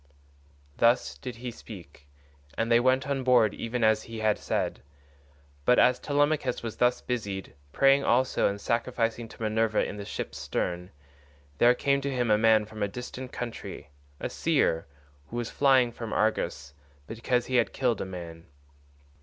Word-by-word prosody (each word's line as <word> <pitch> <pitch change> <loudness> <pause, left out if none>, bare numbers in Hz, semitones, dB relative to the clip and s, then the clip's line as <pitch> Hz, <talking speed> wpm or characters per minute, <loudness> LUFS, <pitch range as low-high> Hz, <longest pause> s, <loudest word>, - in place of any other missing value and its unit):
Thus 115 - +3
did 125 - -6
he 120 +1 -6
speak, 85 -11 -12 0.5
and 115 +1 0
they 115 - +6
went 130 +2 +2
on 135 -2 -1
board 120 -4 +4
even 115 +1 -3
as 110 0 +4
he 115 0 -9
had 110 -1 +1
said. - - -2 0.8
But 125 - +4
as 125 0 +4
Telemachus 145 -3 0
was 115 -2 -5
thus 125 0 +2
busied, 100 -6 -4 0.2
praying 135 - +4
also 130 +2 +2
and 100 0 -3
sacrificing 115 0 -1
to - - -15
Minerva 110 0 +1
in 105 - -6
the 100 - -6
ship's - - -5
stern, 90 +1 -3 0.7
there 120 +1 +6
came 140 +2 +1
to 140 - -2
him 125 -4 0
a 105 - +5
man 110 -1 +4
from 110 0 -10
a 100 - +2
distant 125 +4 -7
country, 115 - -7 0.3
a - - -2
seer, 80 -2 +1 0.4
who - - -9
was 120 -1 -3
flying 130 -4 +4
from 115 -1 -6
Argos 75 -10 -1 0.3
because 120 - -1
he 130 - 0
had 120 - +2
killed 125 -5 0
a - - 0
man. 85 -3 -9
115 Hz, 165 wpm, -28 LUFS, 105-125 Hz, 0.8 s, they